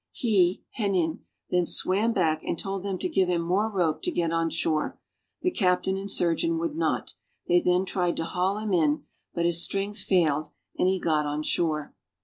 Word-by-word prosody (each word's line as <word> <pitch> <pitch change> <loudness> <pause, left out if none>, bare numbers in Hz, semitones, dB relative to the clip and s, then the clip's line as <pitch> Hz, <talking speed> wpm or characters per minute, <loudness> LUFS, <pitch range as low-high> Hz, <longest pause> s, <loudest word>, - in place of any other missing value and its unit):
He 190 -7 +2 0.2
(Henin) 185 -6 0 0.3
then 180 -1 +2
swam 205 +5 +1
back, 160 -7 +1
and - - -2
told 195 +1 -4
them 195 -1 -3
to - - -1
give 190 - +2
him 170 -1 +1
more 195 +6 +1
rope 175 -7 0
to - - -1
get 170 - 0
on 165 0 +1
shore. 160 -1 -1 0.5
The 360 - +2
captain 190 - +1
and 195 +1 -5
surgeon 190 - +1
would 325 -2 -2
not. 335 - -1 0.3
They 175 0 +4
then 180 +1 +2
tried 180 -2 -1
to - - -1
haul 185 +4 -1
him 215 -2 -2
in, 155 -4 +2 0.3
but 170 -1 0
his 170 -1 +2
strength 200 +3 -1
failed 155 -5 +2 0.3
and - - +2
he 190 0 +1
got 155 -3 +1
on 150 +1 -2
shore. 155 -2 0
180 Hz, 190 wpm, -27 LUFS, 165-195 Hz, 0.5 s, They